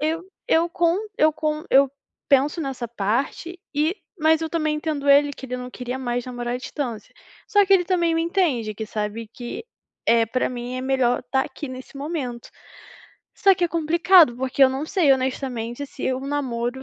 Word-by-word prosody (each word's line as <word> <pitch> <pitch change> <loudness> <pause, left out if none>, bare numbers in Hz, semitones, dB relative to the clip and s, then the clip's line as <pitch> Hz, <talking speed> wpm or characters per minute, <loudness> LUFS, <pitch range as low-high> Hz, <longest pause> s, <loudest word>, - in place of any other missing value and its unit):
eu 320 +3 -1 0.2
eu 335 +1 +3
com 340 +1 +2 0.2
eu 310 0 +5
com 305 0 -2
eu 275 +1 +6 0.4
penso 280 +4 +3
nessa 265 -4 -4
parte 240 - -2
e 310 +4 +1 0.3
mas 315 +1 +4
eu 320 - -2
também 310 -2 0
entendo 300 -2 -3
ele 285 +1 +6
que 265 - -10
ele 250 0 -4
não 250 0 -7
queria 250 +1 -5
mais 245 -1 -2
namorar 245 -1 -4
à - - 0
distância. 250 -4 -6 0.3
Só 410 -1 +5
que 390 - +3
ele 360 -2 +5
também 340 -2 +1
me 330 - +1
entende 300 - 0
que 220 +1 -5
sabe 210 +1 -4
que, 245 - -7 0.4
eh, 230 -1 +5
para 255 +4 0
mim 245 0 -5
é 255 - -3
melhor 255 -2 +1
tá 265 0 +2
aqui 285 +1 -7
nesse 260 +1 -9
momento. 275 -5 -4 0.9
Só 390 -2 +5
que 360 - 0
é 345 - +1
complicado, 335 -4 +4
porque 265 +1 0
eu 260 - +8
não 270 +3 -3
sei 330 -7 +2
honestamente 260 -1 -2
se 260 -1 -3
o 255 - -3
namoro 265 -3 -3
270 Hz, 190 wpm, -23 LUFS, 245-320 Hz, 0.9 s, eu